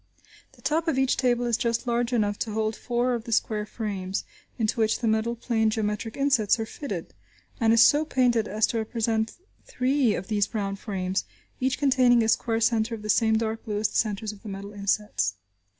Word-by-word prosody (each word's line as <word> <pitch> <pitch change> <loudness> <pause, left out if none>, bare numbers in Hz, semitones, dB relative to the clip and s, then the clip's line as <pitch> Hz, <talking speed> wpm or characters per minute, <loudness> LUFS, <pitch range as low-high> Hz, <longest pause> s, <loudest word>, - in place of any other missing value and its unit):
The - - -21
top 320 +2 0
of 320 - +1
each 265 -1 +2
table 245 -2 +1
is 235 -2 +1
just 235 +1 -1
large 240 0 0
enough 205 -4 0
to 220 - -3
hold 220 0 -1
four 245 +1 0
of 235 -2 -3
the 235 - -6
square 215 -1 0
frames, 195 -4 -4 0.3
into 225 0 0
which 220 -1 +2
the 235 - -2
metal 220 +2 +1
plane 225 -2 +1
geometric 215 0 -2
insets 265 -7 +3
are 225 - -1
fitted, 285 +5 -6 0.5
and 225 -2 +3
is 230 0 +7
so 295 +5 +4
painted 245 -7 +2
as 215 +2 +2
to 230 - -2
represent 225 0 -1 0.3
three 255 -3 +1
of 185 - -4
these 205 -2 +1
brown 200 -3 -3
frames, 190 -2 -3 0.3
each 260 0 0
containing 255 -4 +4
a 220 - +1
square 225 0 +1
centre 230 0 +1
of 215 - -11
the 215 - -6
same 220 +1 +3
dark 225 0 -2
blue 210 -2 -3
as 210 0 +1
the - - -12
centres 215 -1 -1
of 205 -2 -14
the 215 - -8
metal 200 +1 -7
insets. 200 - -1
225 Hz, 205 wpm, -26 LUFS, 210-240 Hz, 0.5 s, is